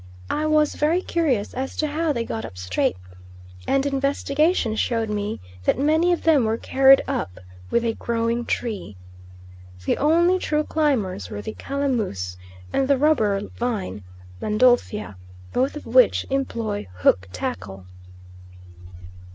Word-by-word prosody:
I 310 - 0
was 305 -1 +3
very 330 +5 +1
curious 275 -12 0
as 265 +1 -4
to 310 - +1
how 310 +2 0
they 235 -5 -1
got 225 - -4
up 90 - -9
straight, 90 0 -1 0.7
and 275 0 +2
investigation 280 -1 +1
showed 225 -1 0
me 210 0 -3 0.3
that - - +3
many 315 +5 +3
of 350 - 0
them 310 -6 +4
were 220 +1 0
carried 270 +2 +5
up 90 - -3 0.3
with 235 - +1
a 225 - +1
growing 230 +1 -1
tree. 200 - -3 0.9
The - - 0
only 340 +5 +3
true 305 -3 0
climbers 230 - -1
were 105 -1 -6
the 110 - -5
calamus 225 - -2 0.4
and 270 - +1
the 280 -1 +3
rubber 225 -9 +2 0.2
vine 205 - -3 0.4
(Landolphia), 215 - +2 0.4
both 260 +4 +1
of 300 - -8
which - - +4
employ 230 - -2
hook 95 +1 +3
tackle. 95 +1 -5
245 Hz, 135 wpm, -23 LUFS, 205-300 Hz, 0.9 s, carried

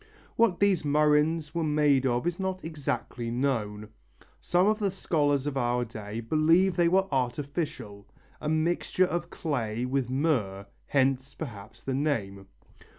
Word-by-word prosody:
What 225 -6 +3
these 200 -4 +3
murrhines 150 +1 +2
were 170 -1 -1
made 150 -3 +3
of 120 +2 0
is 175 +1 -1
not 190 -2 -3
exactly 140 -6 -3
known. 115 -5 -2 0.5
Some 180 +1 +2
of 215 +1 +2
the 205 -2 +1
scholars 145 -7 0
of 145 -2 -2
our 120 -1 +1
day 110 0 -6
believe 165 +8 +3
they 175 -1 +3
were 190 +2 +3
artificial, 130 -4 -3 0.3
a 150 - -2
mixture 170 +3 +1
of 175 -1 -3
clay 125 - -2
with 130 -1 -1
myrrh, 125 -9 0 0.2
hence, 135 0 +1
perhaps, 110 +1 -9
the 135 - -2
name. 105 -9 -2
145 Hz, 145 wpm, -28 LUFS, 120-165 Hz, 0.5 s, What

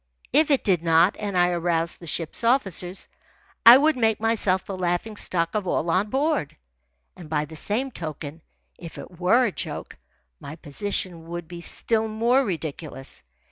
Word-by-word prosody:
If 310 0 +4
it 280 -3 +2
did 185 -5 +2
not, 165 +2 +4
and 200 -3 -3
I 175 0 +4
aroused 170 -1 -1
the 170 - -11
ship's 165 +6 -1
officers, 195 - +1 0.6
I 240 +2 +12
would 310 +3 +3
make 225 -3 +1
myself 210 -4 +1
the 195 - -5
laughing 180 +4 -2
stock 170 -4 -1
of 210 -3 -2
all 170 -1 0
on 195 +4 +1
board. 280 - -1 0.6
And 170 -4 -12
by 150 -1 0
the 160 +2 -12
same 235 - -1
token, 155 - -7 0.4
if 170 -2 -10
it 175 - -11
were 230 +8 +4
a 220 - 0
joke, - - -6 0.4
my 150 - -8
position 170 +1 -4
would 175 -1 -6
be 175 0 -9
still 225 +5 0
more 235 +5 +2
ridiculous. 155 - -6
180 Hz, 170 wpm, -24 LUFS, 165-220 Hz, 0.6 s, I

